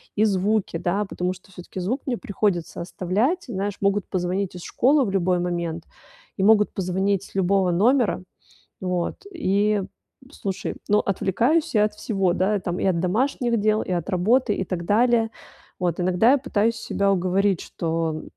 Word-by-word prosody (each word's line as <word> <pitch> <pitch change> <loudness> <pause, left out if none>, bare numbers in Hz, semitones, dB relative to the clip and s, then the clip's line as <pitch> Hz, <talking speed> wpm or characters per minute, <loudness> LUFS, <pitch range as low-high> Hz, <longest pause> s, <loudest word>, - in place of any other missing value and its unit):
и 210 - +3
звуки, 205 -2 +1
да, 195 +5 -1
потому 180 -1 -2
что 185 +1 -17
всё-таки 180 +1 -9
звук 230 +10 -2
мне 245 -3 0
приходится 195 -5 -2
оставлять, 205 - -1
знаешь, 200 -3 -3
могут 200 0 +1
позвонить 185 +1 -2
из 180 - -8
школы 275 +2 +3
в 200 - -2
любой 185 -2 +1
момент 170 -2 -2 0.5
и - - -1
могут 210 0 +4
позвонить 190 +1 0
с - - -15
любого 190 0 +2
номера, 225 +2 +2 0.6
вот, 180 -2 -2 0.2
и, 210 - +1 0.5
слушай, 195 -9 -4
но 210 +1 +4
отвлекаюсь 240 - +1
я 210 - +5
от 210 0 -2
всего, 195 -4 0
да, 195 +3 +1
там, 175 0 -3
и - - -1
от 180 -3 +2
домашних 235 +5 0
дел, 215 +1 +2
и - - -7
от 175 +1 -2
работы, 210 +5 +2
и 190 - -2
так 175 -2 -4
далее, 225 +3 +3 0.5
вот. 175 -2 0
Иногда 185 +6 +3
я 285 - +4
пытаюсь 230 -4 0
себя 200 -2 0
уговорить, 190 0 +1
что, 165 -1 -2
195 Hz, 165 wpm, -23 LUFS, 180-215 Hz, 0.6 s, я